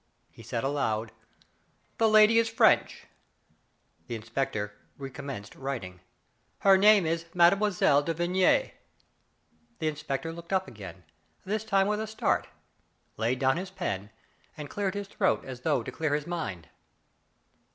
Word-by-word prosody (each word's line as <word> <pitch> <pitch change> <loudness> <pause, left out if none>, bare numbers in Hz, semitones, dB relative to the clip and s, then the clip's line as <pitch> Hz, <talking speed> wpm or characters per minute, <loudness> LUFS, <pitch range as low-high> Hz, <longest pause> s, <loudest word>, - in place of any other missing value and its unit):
He - - -15
said 115 - -4
aloud: 115 -6 -1 0.9
"The 225 -1 +4
lady 215 +1 +6
is 230 0 +1
French;" 225 - +3 1.0
the 120 - -4
in 110 - -8
spector 115 -3 -2 0.3
recommenced 135 -6 -7
writing; 120 -10 -6 0.3
" - - -43
her 195 -1 +8
name 205 -1 +6
is 165 +1 -1
Mme. 170 -1 +7
de 180 -7 +2
Vigny." 180 +2 +2 1.1
The 160 - -2
inspector 155 +1 -3
looked 170 +2 -8
up 190 0 +1
again, 95 -4 -10 0.4
this 215 +2 -2
time 195 -3 +2
with 210 +1 0
a 220 - -3
start, 215 0 0 0.7
laid 115 +3 0
down 130 +4 +2
his 185 +2 -4
pen, 100 - -4 0.5
and 150 -2 -7
cleared 200 -2 -2
his 200 -1 -4
throat 195 -1 0
as 130 -2 -8
though 125 - +1
to 130 - -6
clear 150 +2 -1
his 150 0 -3
mind. 150 - -5
155 Hz, 145 wpm, -28 LUFS, 125-195 Hz, 1.1 s, her